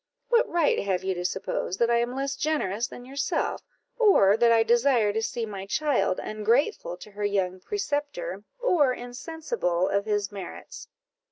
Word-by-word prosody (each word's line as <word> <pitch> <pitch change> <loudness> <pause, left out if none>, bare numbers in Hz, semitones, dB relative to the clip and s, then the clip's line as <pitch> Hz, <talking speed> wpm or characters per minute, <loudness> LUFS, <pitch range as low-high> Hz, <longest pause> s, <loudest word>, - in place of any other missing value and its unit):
what 475 -1 +3
right 335 -3 +2
have 190 -2 -1
you 190 0 0
to 175 0 -4
suppose 185 0 -2
that 235 +2 +2
I 235 - +4
am 240 +2 -1
less 275 +1 -2
generous 240 -8 -1
than 245 - -11
yourself, 275 +2 -2 0.4
or 300 - +6
that 235 +1 +4
I 225 -1 +5
desire 235 -2 +3
to 220 - 0
see 230 +1 -2
my 195 -2 -7
child 250 -6 +1
ungrateful 245 - 0
to 210 - -12
her 205 +1 -6
young 190 -2 0
preceptor, 400 - -3 0.2
or 305 - +3
insensible 245 - -2
of 200 +1 0
his 205 -1 0
merits?" 200 -2 -8
235 Hz, 165 wpm, -26 LUFS, 200-290 Hz, 0.4 s, or